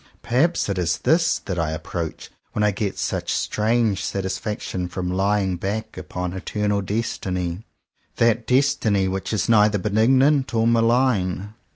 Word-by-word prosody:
Perhaps 150 +9 +1
it 100 -2 -1
is 85 -1 0
this 165 +1 +2
that 90 -3 -4
I 80 -1 0
approach 80 +1 -5 0.2
when 105 - 0
I 105 - +4
get 100 0 -3
such - - -2
strange 110 -2 +1
satisfaction 95 -1 -3
from 90 +1 -4
*' - - -2
lying 95 -1 +1
back" 110 +5 -4
upon 90 0 -5
eternal 105 +2 -1
Destiny 90 -4 -2 0.3
— - - -44
that 115 0 +2
Destiny 110 -7 +2
which 95 0 -3
is 110 - 0
neither 105 -2 +4
benignant 130 +8 +3
nor 115 0 +2
malign. 115 -5 +2
105 Hz, 150 wpm, -22 LUFS, 95-115 Hz, 0.3 s, I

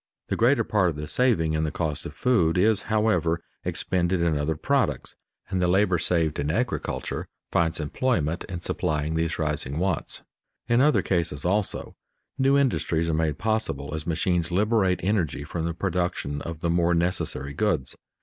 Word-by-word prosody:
The - - 0
greater 120 +1 +3
part 105 -4 +2
of 80 - -4
the 75 0 -5
saving 100 -12 +2
in 80 0 0
the 80 - 0
cost 75 -2 -3
of - - -11
food 90 -10 +2
is, 105 +2 +3
however, 100 -7 +2 0.2
expended 90 0 0
in 85 -2 +2
other 75 +2 0
products, - - 0 0.3
and 95 - -1
the 90 - +3
labor 95 -1 +3
saved 80 -5 +1
in 70 +1 -1
agriculture 125 +10 -2 0.2
finds 80 -1 +1
employment 85 - 0
in 90 -2 -6
supplying 75 -2 -1
these 80 0 -1
rising 75 -3 -1
wants. 90 -2 -1 0.4
In 120 +1 +3
other 150 +2 +4
cases 85 -5 -1
also, 100 +2 0 0.4
new 135 +1 +4
industries 85 - +1
are - - +1
made 80 -2 0
possible 110 -11 -1
as 80 0 -4
machines 85 0 0
liberate 95 0 +2
energy 90 -7 0
from 80 +3 -4
the 85 - -1
production 85 -5 -2
of 85 -1 -6
the 85 - 0
more 85 0 +2
necessary 85 -5 -1
goods. 75 -6 0
85 Hz, 170 wpm, -25 LUFS, 80-100 Hz, 0.4 s, other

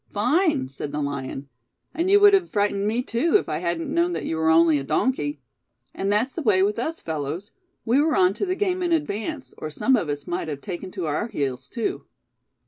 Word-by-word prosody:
'Fine,' 275 - +2
said 135 +2 -7
the 150 - -3
lion, 140 -1 -4 0.5
'and 340 +3 0
you 405 +1 +6
would 410 0 +7
have 380 -3 +3
frightened 205 -1 0
me 230 +4 0
too, 260 - 0
if - - -5
I - - -2
hadn't 170 -1 -2
known 345 +1 +2
that - - -3
you - - -2
were 160 0 +1
only 160 -2 +5
a - - -5
donkey.' 145 - -1 0.5
And 195 +1 -1
that's 225 +6 +1
the 335 - -4
way 205 -8 +3
with 210 +3 0
us, 320 +7 -3
fellows; 160 +6 -4 0.3
we 250 +5 +3
were 310 +1 +2
on 185 +1 +4
to 400 - -2
the 365 - 0
game 370 -2 0
in 350 -1 0
advance, 295 -2 -2
or 155 - -4
some 260 - +2
of 180 -10 -1
us 145 -1 -3
might 175 -1 -3
have 145 -3 -5
taken 185 -1 -6
to 180 - -3
our 155 +8 -1
heels 140 - -3
too." 230 - -3
205 Hz, 225 wpm, -24 LUFS, -, 0.5 s, would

